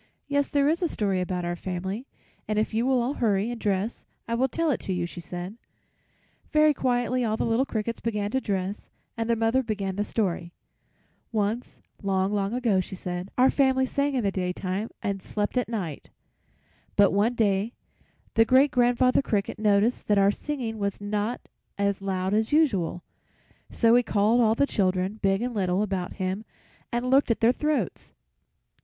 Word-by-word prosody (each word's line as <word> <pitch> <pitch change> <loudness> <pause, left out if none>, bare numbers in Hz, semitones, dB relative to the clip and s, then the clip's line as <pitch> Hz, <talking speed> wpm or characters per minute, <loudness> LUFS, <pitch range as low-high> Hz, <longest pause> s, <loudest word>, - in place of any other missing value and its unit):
"Yes, 285 0 +1
there 285 -1 +2
is 325 +4 +1
a 350 - +2
story 195 - -1
about 180 -1 -2
our 175 0 -2
family, 190 +7 -4 0.4
and 215 0 -1
if 215 +1 0
you 230 +3 +1
will 255 -2 +3
all 255 +4 -1
hurry 215 -3 +1
and 240 - -6
dress 205 +2 -1 0.2
I 230 - -2
will 255 +3 +2
tell 325 +4 0
it 255 - -1
to 190 - -3
you," 175 -1 -1
she 175 - -8
said. 180 +5 -7 0.9
Very 305 0 +5
quietly 250 -1 0
all 220 -1 0
the - - 0
little 235 +4 +1
crickets 225 +1 -3
began 210 -3 -2
to 265 - 0
dress, 195 -1 -3 0.3
and 230 0 -3
their 230 - +4
mother 225 +3 +2
began 200 -5 -3
the 205 - +1
story: 180 -6 -2 0.8
"Once, 220 +2 -2 0.2
long, 195 0 0
long 200 -1 0
ago," 235 -5 +1
she 185 - -4
said, 180 +1 -5
"our 255 +1 +5
family 265 -2 +3
sang 280 +1 0
in 250 - 0
the 200 - +1
daytime 185 +3 -2
and 200 -2 -2
slept 205 +4 -3
at 250 -2 0
night; 185 -11 -4 0.9
but 205 -1 +5
one 215 +5 +2
day 210 0 +1 0.6
the 225 - +6
Great 260 +4 +4
grandfather 245 +1 +3
Cricket 210 -6 -2
noticed 210 +2 +2
that 210 - +3
our 200 0 +5
singing 235 -3 -4
was 200 -1 -2
not 210 +3 -2 0.4
as 200 -1 0
loud 190 0 -1
as 220 +1 +1
usual, 200 - +2 0.7
so 230 -1 +3
he 245 - +6
called 220 +1 +2
all 220 -1 +4
the 280 - +3
children, 190 -2 0
big 195 +2 +2
and 250 0 -2
little, 190 -1 +1
about 190 -3 -3
him 190 +2 -3 0.5
and 240 +2 -1
looked 275 0 +4
at 230 - +1
their 230 +1 +5
throats. 300 +2 -2
215 Hz, 185 wpm, -26 LUFS, 195-245 Hz, 0.9 s, the